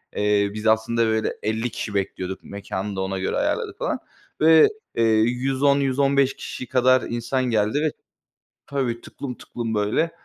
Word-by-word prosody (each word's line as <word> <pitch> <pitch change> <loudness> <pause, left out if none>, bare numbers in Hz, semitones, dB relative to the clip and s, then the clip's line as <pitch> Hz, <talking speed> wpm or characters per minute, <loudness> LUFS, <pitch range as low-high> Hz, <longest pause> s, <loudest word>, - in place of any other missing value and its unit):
eee, 105 -1 +2
biz 110 +1 -3
aslında, 110 +1 +2
böyle, 110 0 0
50 110 +3 -1
kişi 105 -1 -5
bekliyorduk, 95 -1 -3
mekânı 100 0 -5
da 95 - -2
ona 95 0 -2
göre 95 - -1
ayarladık - - -1
falan. - - -2 0.4
Ve, 160 0 +7 0.3
eee, 115 - +2 0.2
110-115 135 +2 +2
kişi 125 - -7
kadar 130 0 +4
insan 120 +3 -1
geldi 110 +2 +1
ve 155 -2 +1 0.8
Tabii. 125 -4 -2
tıklım 125 -3 -7
tıklım, 115 -2 -5
böyle, 105 +11 +1
115 Hz, 145 wpm, -23 LUFS, 105-130 Hz, 0.8 s, Ve